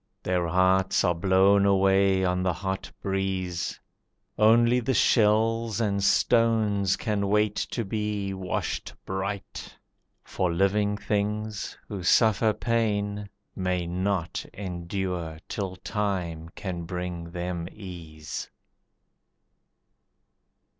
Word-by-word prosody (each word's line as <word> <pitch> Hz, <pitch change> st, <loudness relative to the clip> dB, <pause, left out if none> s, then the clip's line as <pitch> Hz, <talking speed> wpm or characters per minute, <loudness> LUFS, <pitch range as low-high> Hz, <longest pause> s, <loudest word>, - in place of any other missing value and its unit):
Their 90 Hz, -2 st, 0 dB
hearts 95 Hz, +2 st, +3 dB
are 90 Hz, -3 st, +3 dB
blown 95 Hz, +3 st, +4 dB
away 95 Hz, -1 st, +3 dB
on 90 Hz, 0 st, +1 dB
the 90 Hz, -1 st, +1 dB
hot 95 Hz, +2 st, -4 dB
breeze. 95 Hz, -3 st, -2 dB, 0.6 s
Only 115 Hz, +3 st, +5 dB
the 125 Hz, +2 st, 0 dB
shells 115 Hz, 0 st, +3 dB
and 100 Hz, -3 st, 0 dB
stones 110 Hz, -4 st, +3 dB
can 105 Hz, -3 st, -1 dB
wait 105 Hz, 0 st, +2 dB
to 115 Hz, -, -2 dB
be 105 Hz, -1 st, -2 dB
Washed 95 Hz, -1 st, -3 dB
bright. 95 Hz, +1 st, -5 dB, 0.5 s
For 90 Hz, -2 st, -1 dB
living 100 Hz, +3 st, +1 dB
things, 105 Hz, 0 st, -2 dB
who 100 Hz, -3 st, -5 dB
suffer 110 Hz, +4 st, +4 dB
pain, 105 Hz, -2 st, -1 dB, 0.3 s
May 90 Hz, -2 st, -1 dB
not 90 Hz, 0 st, -1 dB
endure 90 Hz, -3 st, -4 dB
till 95 Hz, -3 st, -4 dB
time 90 Hz, -5 st, -3 dB
can 90 Hz, -3 st, -5 dB
bring 90 Hz, -1 st, -5 dB
them 85 Hz, -1 st, -4 dB
ease. 85 Hz, -7 st, -8 dB
95 Hz, 100 wpm, -27 LUFS, 90-105 Hz, 0.6 s, Only